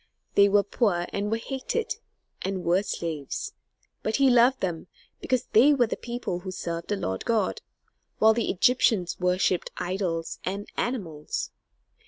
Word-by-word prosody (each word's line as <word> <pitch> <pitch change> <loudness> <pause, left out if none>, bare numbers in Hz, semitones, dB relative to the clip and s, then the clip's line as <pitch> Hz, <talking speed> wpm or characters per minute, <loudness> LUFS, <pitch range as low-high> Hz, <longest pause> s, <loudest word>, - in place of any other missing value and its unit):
They 200 0 +6
were 205 0 +4
poor 200 -4 +1
and 200 +1 -1
were 225 - +1
hated, 270 - -3 0.4
and 190 -1 -3
were 175 +3 +3
slaves, 165 -7 -4 0.5
but 215 - -1
he 275 -2 +5
loved 245 +2 +5
them, 175 -2 -3 0.3
because 255 -2 0
they 280 +7 +7
were 245 -3 +4
the 225 - -3
people 240 -7 -4
who 185 +1 -7
served 170 -2 -4
the 205 - 0
Lord 95 - -3
God, 220 -4 0 0.6
while 220 0 +6
the 230 +1 -1
Egyptians 210 -3 +2
worshipped 180 0 +1
idols 175 -3 -2
and 200 +2 -3
animals. 175 - -3
200 Hz, 150 wpm, -26 LUFS, 175-235 Hz, 0.6 s, they